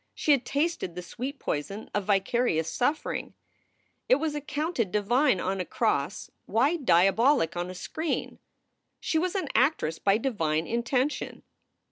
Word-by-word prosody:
She 300 - +1
had 275 -3 +3
tasted 285 - -1
the 180 - -5
sweet 260 - -5
poison 195 - -4
of 205 -2 -1
vicarious 195 -4 +1
suffering. 290 +5 -1 0.7
It - - +7
was 300 +2 -1
accounted 295 - -2
divine 240 +2 +2
on 190 0 -1
a - - -1
cross; - - -1 0.2
why 270 +9 +2
diabolic 195 - +3
on 175 +1 -3
a 185 - -7
screen? 315 - -3 0.6
She 320 - 0
was 360 +3 -1
an 385 - -1
actress 255 - +2
by 200 +1 +3
divine 165 - 0
intention. 250 - -1
235 Hz, 140 wpm, -27 LUFS, 185-290 Hz, 0.7 s, It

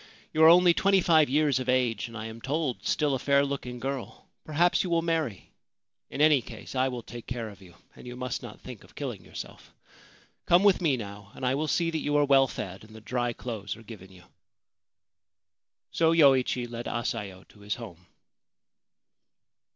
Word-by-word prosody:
You 155 - +3
are 160 - +10
only 175 +1 +7
twenty 195 +2 +3
five 160 -5 +4
years 145 -1 +2
of 130 0 -4
age, 125 -4 +1
and 115 0 -9
I 110 - -6
am 110 +1 -8
told 140 -1 -2
still 150 -2 +1
a 130 - -1
fair 140 +1 +3
looking 125 -3 -5
girl. 135 0 -5 0.2
Perhaps 170 +3 +2
you 185 - -4
will 165 -1 +1
marry! 160 - -2 0.6
In 145 - -4
any 150 -3 +5
case, - - -10
I 130 0 +1
will 125 -3 -5
take 120 -1 -10
care 120 -3 -4
of 100 -1 -14
you, 90 -2 -16 0.2
and - - -13
you 125 - -7
must 125 0 -4
not 120 -4 -10
think 125 -5 -10
of 100 +4 -20
killing 120 -10 -5
yourself. - - -10 0.8
Come 175 +3 +5
with 200 -3 +4
me 150 -7 +2
now; 100 -2 -9
and 130 - -5
I 125 - +2
will 150 +3 -1
see 165 +2 +1
that 160 - -2
you 145 0 0
are 145 - +4
well 135 -1 +5
fed, 95 -5 -7
and 110 0 -15
that 110 -1 -13
dry 120 -1 -1
clothes 110 -4 -6
are 115 - -14
given 100 -4 -12
you/ 90 -2 -16 1.7
So 165 0 +3
Yoichi 130 -5 +4
led 120 0 -6
Asayo 100 -5 -4
to 105 - -20
his 100 0 -3
home. 90 -7 -11
125 Hz, 195 wpm, -27 LUFS, 110-150 Hz, 1.7 s, are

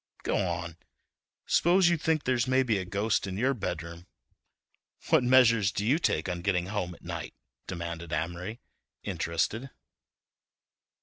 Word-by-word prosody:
"Go - - 0
on, 85 -1 -2 0.7
s'pose 175 +2 +4
you 170 - +3
think 160 -1 0
there's 125 -1 +1
maybe 130 -5 +2
a 95 - -4
ghost 100 +2 0
in 95 0 -4
your 130 +5 +2
bedroom—what 85 - -5
measures 115 -5 +5
do 100 +2 -2
you 140 +8 +3
take 80 - 0
on 90 -1 -3
getting 90 -2 +1
home 90 -4 -2
at - - -21
night?" - - -6 0.3
demanded 85 -2 -5
Amory, 85 +8 -3 0.4
interested. 105 +10 -2
100 Hz, 130 wpm, -29 LUFS, 85-125 Hz, 0.7 s, measures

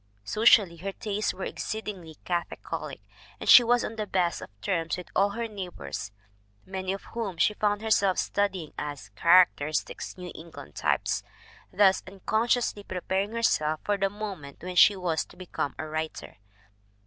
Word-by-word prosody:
Socially, 210 - +4
her 195 +4 -5
tastes 210 +1 -2
were 190 - -7
exceedingly 195 -7 -5
cath 175 -1 0 0.2
olic, - - -4 0.4
and - - -7
she 245 - +10
was 240 +1 +2
on 225 - -6
the 215 -1 -3
best 180 -3 0
of - - -8
terms 165 - -1
with 180 - -9
all 200 +1 +4
her 235 0 -2
neighbors, 185 - -6 0.5
many 190 0 -3
of 195 - -5
whom 215 -7 -3
she 210 - +3
found 210 0 0
herself 200 -4 +3
studying 190 -6 -1
as 145 -7 -6
characteristic 160 - +3 0.2
New 180 -1 -7
England 160 - -11
types, - - 0 0.5
thus 190 0 +4
uncon 205 +4 -1
sciously 235 -4 +1
preparing 190 +3 -2
herself 155 -10 +1
for 205 - +1
the 195 0 +1
moment 195 -9 -7
when 180 0 -5
she 200 +3 +7
was 175 -4 -1
to - - -18
become 175 -5 -4
a 155 - -4
writer. 155 -5 -5
190 Hz, 160 wpm, -27 LUFS, 170-210 Hz, 0.5 s, she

